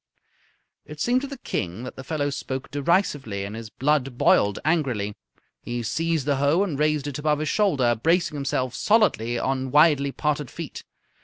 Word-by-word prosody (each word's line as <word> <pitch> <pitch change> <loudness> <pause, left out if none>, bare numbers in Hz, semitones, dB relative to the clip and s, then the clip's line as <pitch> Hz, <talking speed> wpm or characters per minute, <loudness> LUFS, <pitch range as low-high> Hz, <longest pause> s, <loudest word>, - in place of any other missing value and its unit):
It 150 0 -11
seemed 245 - +2
to 280 - -4
the 275 0 -8
King 95 - -4
that 125 - -7
the 130 - -8
fellow 145 0 -2
spoke 135 -1 -5
derisively, 145 - 0
and 100 +2 -6
his 115 -1 -7
blood 135 -1 0
boiled 100 -4 +3
angrily. 130 -11 0 0.5
He 120 0 -4
seized 165 +4 -1
the 145 -2 +1
hoe 145 +7 +3
and 160 -8 -3
raised 150 -2 +1
it 145 -1 -4
above 150 0 +1
his 155 0 -2
shoulder, 140 - +2
bracing 165 +9 +1
himself 130 -3 -1
solidly 155 - +2
on 130 +1 -1
widely 145 -1 +4
parted 150 -2 -1
feet. - - -7
145 Hz, 170 wpm, -24 LUFS, 125-155 Hz, 0.5 s, widely